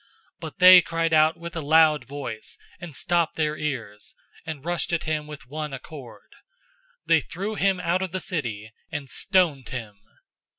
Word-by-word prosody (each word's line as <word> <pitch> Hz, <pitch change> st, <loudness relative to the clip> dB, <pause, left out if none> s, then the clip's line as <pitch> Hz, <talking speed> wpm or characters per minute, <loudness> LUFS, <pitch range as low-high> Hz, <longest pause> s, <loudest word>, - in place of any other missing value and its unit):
007:057 -, -, -33 dB, 0.3 s
But -, -, -8 dB
they 180 Hz, 0 st, +9 dB
cried 165 Hz, 0 st, -1 dB
out 155 Hz, +1 st, +4 dB
with 170 Hz, 0 st, -8 dB
a 165 Hz, -, -2 dB
loud 155 Hz, -2 st, +4 dB
voice, 135 Hz, -5 st, -7 dB, 0.2 s
and 175 Hz, -5 st, -9 dB
stopped 170 Hz, +1 st, 0 dB
their 155 Hz, -1 st, 0 dB
ears, 115 Hz, -10 st, -5 dB, 0.3 s
and 155 Hz, -3 st, -6 dB
rushed 175 Hz, -1 st, -2 dB
at 170 Hz, -, 0 dB
him 155 Hz, -1 st, -2 dB
with 150 Hz, -2 st, -10 dB
one 150 Hz, +1 st, -5 dB
accord. 135 Hz, -2 st, -11 dB, 0.7 s
007:058 -, -, -64 dB
They -, -, +5 dB
threw 195 Hz, +5 st, -5 dB
him 195 Hz, -3 st, +1 dB
out 180 Hz, +1 st, 0 dB
of 190 Hz, -2 st, -3 dB
the 185 Hz, -, -2 dB
city, 115 Hz, -, -4 dB, 0.2 s
and 150 Hz, -3 st, -5 dB
stoned 160 Hz, -, +1 dB
him. 110 Hz, -6 st, -7 dB
155 Hz, 175 wpm, -25 LUFS, 135-170 Hz, 0.7 s, they